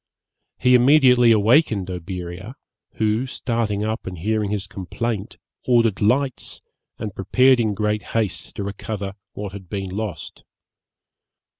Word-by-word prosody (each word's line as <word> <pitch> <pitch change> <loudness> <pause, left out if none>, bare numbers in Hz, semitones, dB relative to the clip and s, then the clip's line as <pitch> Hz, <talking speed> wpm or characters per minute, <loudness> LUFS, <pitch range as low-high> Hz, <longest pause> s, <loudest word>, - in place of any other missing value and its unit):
He 125 -1 +3
immediately 125 -2 +6
awakened 110 - +3
Oberea, 90 +5 -6 0.4
who, 110 +4 0
starting 115 -5 -2
up 110 0 -3
and 90 -1 -5
hearing 105 +3 -1
his 105 -1 -2
complaint, 105 +3 -4 0.3
ordered 115 -5 +3
lights, 130 +5 0 0.3
and 105 -3 -5
prepared 130 +7 +3
in 110 -3 0
great 105 +1 0 0.2
haste 110 -5 -2
to - - -4
recover 100 0 -5 0.2
what 105 -1 -6
had 95 -3 -10
been 95 -1 -4
lost. 100 -4 -5
105 Hz, 125 wpm, -22 LUFS, 100-120 Hz, 0.4 s, immediately